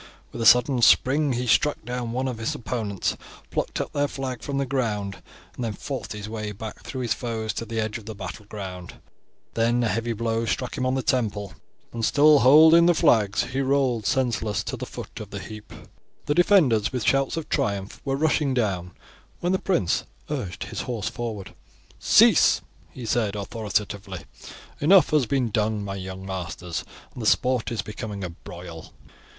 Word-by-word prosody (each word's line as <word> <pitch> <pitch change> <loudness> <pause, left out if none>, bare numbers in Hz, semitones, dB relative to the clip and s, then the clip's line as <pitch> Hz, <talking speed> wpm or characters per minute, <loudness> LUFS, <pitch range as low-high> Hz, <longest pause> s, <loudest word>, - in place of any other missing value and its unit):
With - - -6
a 115 - +4
sudden 125 +2 +5
spring 140 +4 +4
he 125 +1 -2
struck 145 +2 +2
down 120 -1 -3
one 130 +2 -1
of 125 -3 -4
his 110 - -2
opponents, 110 -5 -2 0.4
plucked - - -2
up - - -4
their 145 0 +1
flag 130 -4 -5
from 140 +4 -3
the 140 - 0
ground, 110 -7 -2 0.3
and 125 - -5
then 115 -2 -2
fought 130 -2 -5
his 105 -1 -6
way 110 -1 -4
back 105 +2 -8
through 130 - -6
his 120 -3 +1
foes 110 -3 -3
to 115 - -4
the 115 0 -3
edge 110 +1 -2
of 110 - -16
the 110 - -6
battleground; 95 -1 -7 0.6
then 120 +2 +2
a - - +2
heavy 115 +2 -1
blow 115 +1 -1
struck 125 +1 -2
him 130 - -1
on 130 - +1
the 135 - -1
temple, 105 -6 -1 0.4
and, 115 -1 -4
still 150 +4 +6
holding 160 +6 +7
the 175 - +4
flags, 110 - +3
he 130 +3 -2
rolled 130 -6 +1
senseless 115 -4 0
to - - -4
the - - -6
foot - - -8
of - - -8
the - - -6
heap. 105 -1 -9 0.5
The 145 - +1
defenders 155 - +4
with 125 -5 -3
shouts 135 +3 +2
of 165 - -4
triumph 100 -1 -2
were 135 -1 -1
rushing 145 -2 +1
down 95 -7 -1 0.5
when 175 - 0
the 190 - +1
prince 175 - 0 0.3
urged 90 -2 -4
his 110 -3 -5
horse 120 -5 -3
forward. 110 -5 -6 0.5
"Cease!" - - +5 0.3
he 125 - -9
said 110 -3 0
authoritatively. 100 -3 -3 0.6
"Enough 185 +5 +5
has 150 -6 +3
been 125 -4 0
done, 105 0 0
my 100 - -4
young 95 0 -7
masters, 90 -2 -5 0.3
and 125 - -8
the 110 - -1
sport 125 -1 +2
is 115 - -2
becoming 105 -2 -6
a 90 - -4
broil." 85 -1 -10
115 Hz, 185 wpm, -25 LUFS, 105-130 Hz, 0.6 s, holding